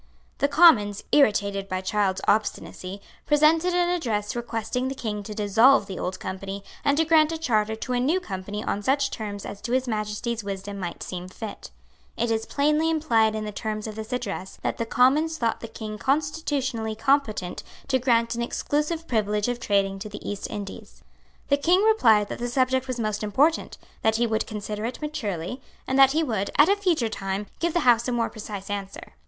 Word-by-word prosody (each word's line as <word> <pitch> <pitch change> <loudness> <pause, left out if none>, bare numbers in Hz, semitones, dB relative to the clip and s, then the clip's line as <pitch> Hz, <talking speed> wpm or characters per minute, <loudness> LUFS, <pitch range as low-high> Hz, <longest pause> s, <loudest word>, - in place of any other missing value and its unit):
The 280 - +3
Commons, 235 - +5
irritated 200 -7 +2
by 185 0 -2
Child's 190 0 0
obstinacy, 200 -2 -1 0.3
presented 320 +4 +4
an 355 0 +3
address 225 -12 -1
requesting 240 +1 -2
the 270 - -3
King 210 -4 -4
to 210 +1 -8
dissolve 220 +4 +5
the 190 -2 -6
Old 185 +1 -3
Company, 195 +1 -5 0.2
and 285 0 +2
to 320 - +3
grant 315 -1 +4
a 325 - -2
charter 220 -8 +1
to 250 +3 -4
a 245 - +1
new 300 +9 +2
Company 200 - -5
on 205 - -2
such 270 +5 +1
terms 205 -3 -5
as 200 - -7
to 240 - -3
His 260 0 +1
Majesty's 220 +1 -2
wisdom 200 0 -5
might 175 -2 -5
seem 180 -1 -6
fit. 215 +2 -8 0.5
It 235 0 0
is 225 0 -1
plainly 300 +3 +2
implied 230 -9 +2
in 215 0 -3
the 210 - -4
terms 215 +1 -4
of 220 - -5
this 220 0 -7
address 200 -6 -4
that - - -1
the 230 - -1
Commons 300 +7 +3
thought 230 -4 0
the 230 - -7
King 215 -1 -7
constitutionally 275 -6 -1
competent 225 -6 0 0.3
to 260 -1 +3
grant 235 -2 +2
an 235 - -3
exclusive 300 +6 -1
privilege 210 -2 0
of 245 0 -2
trading 195 -3 +1
to 210 +2 -6
the 205 - -8
East 205 -1 -4
Indies. 200 -1 -8 0.5
The 280 - +4
King 350 +7 +3
replied 230 - +4
that - - -5
the 240 0 -2
subject 260 +1 +1
was 255 -2 -3
most 215 -2 -1
important, 275 +10 +1 0.2
that 220 0 +2
he 235 +1 +2
would 220 -1 -1
consider 210 -1 -5
it 240 +2 -4
maturely, 235 - -4 0.2
and 265 +1 0
that 270 0 +7
he 320 +1 +2
would, 220 -8 -1
at 295 +4 +7
a 400 - +5
future 355 - +1
time, 195 -1 -3
give 340 -1 0
the 345 - +3
House 240 -3 +4
a - - 0
more 235 -1 0
precise 205 -2 -7
answer. 195 -1 -6
225 Hz, 195 wpm, -25 LUFS, 205-275 Hz, 0.5 s, that